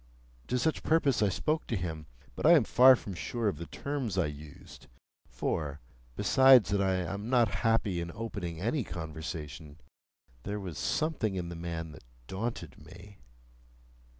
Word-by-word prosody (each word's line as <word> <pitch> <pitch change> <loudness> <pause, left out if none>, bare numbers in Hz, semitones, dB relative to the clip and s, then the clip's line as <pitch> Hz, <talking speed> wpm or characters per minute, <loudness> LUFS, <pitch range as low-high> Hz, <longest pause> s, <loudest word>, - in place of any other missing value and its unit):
To 125 - 0
such 155 +6 0
purpose 155 -7 +2
I 105 - +3
spoke 155 - -1
to 115 - -1
him; 80 -5 -4 0.3
but - - -6
I 170 - +9
am 155 -7 +6
far 130 +4 +7
from 100 -4 -7
sure 115 +6 -3
of 95 -7 -1
the 85 - -6
terms 135 -9 -4
I 95 - +3
used; 75 0 -10 0.4
for, 75 -2 -3 0.4
besides 125 -1 +6
that 100 -1 +2
I 95 -1 +2
am 95 +5 -3
not 120 -4 +4
happy 110 -6 +1
in 85 0 -5
opening 100 -7 -5
any 120 - 0
conversation, 80 -3 -7 0.6
there 105 +6 -4
was 90 -6 -6
something 155 -11 -1
in 90 -2 -3
the 85 - -6
man 85 -1 -5
that 75 - -13 0.2
daunted 110 - -5
me. 95 +2 -14
100 Hz, 160 wpm, -30 LUFS, 85-120 Hz, 0.6 s, I